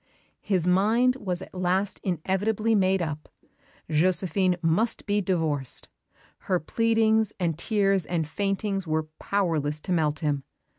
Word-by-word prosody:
His 185 -5 +1
mind 220 +8 +3
was 185 -6 -3
at - - -14
last 185 +2 -1
inevitably 195 +5 0
made 190 -3 +2
up. 155 -1 -5 0.6
Josephine 180 +3 +1
must 195 +9 +1
be 205 0 +1
divorced. 160 -8 -1 0.6
Her 180 -2 +3
pleadings 220 +4 +2
and 170 -3 0
tears 195 -1 +1
and 165 -3 -1
faintings 195 +1 -2
were 155 0 -1
powerless 160 -7 0
to 185 - -5
melt 155 -4 +1
him. 145 -3 0
185 Hz, 130 wpm, -26 LUFS, 160-205 Hz, 0.6 s, mind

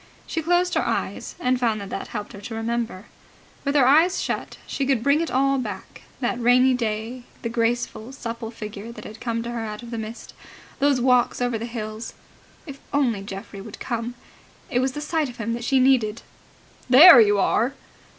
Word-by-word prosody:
She 325 - -3
closed 350 +2 +2
her - - +2
eyes, - - -3
and 255 -6 +1
found 225 -3 +1
that 200 -1 -8
that - - -4
helped 210 -3 -6
her 200 - -10
to 225 +2 -7
remember. 225 -3 -3 0.6
With 280 0 -1
her 275 -4 +5
eyes 320 +8 +5
shut, - - -3
she 275 - -3
could 265 -4 +1
bring 280 +4 +3
it 335 - -2
all 275 +1 +2
back 205 -6 -7 0.2
that 245 0 -1
rainy 250 +2 +5
day, 235 +1 -3 0.2
the 230 - -1
graceful, 235 0 -1
supple 230 -3 -6
figure 215 -1 -8
that - - -10
had 215 - -10
come 230 -2 -2
to 235 - -5
her 240 - -4
out 215 0 -5
of 235 - -9
the 230 - -3
mist, 220 +2 -8 0.5
those 280 -2 +3
walks 250 -1 +3
over 245 -2 0
the 230 - -4
hills... 220 -1 -6 0.5
If 280 -4 -9
only 250 -8 +1
Geoffrey 195 0 -8
would 210 +1 -10
come! 235 0 -4 0.6
It 245 - +2
was 260 0 0
the 295 - -5
sight 305 -2 -1
of 245 - -11
him 230 0 -2
that 235 0 -4
she 265 +2 +2
needed. 240 -4 +2 0.7
"There 270 +1 +10
you 205 -1 +4
are!" 235 +6 +1
240 Hz, 200 wpm, -23 LUFS, 225-265 Hz, 0.7 s, There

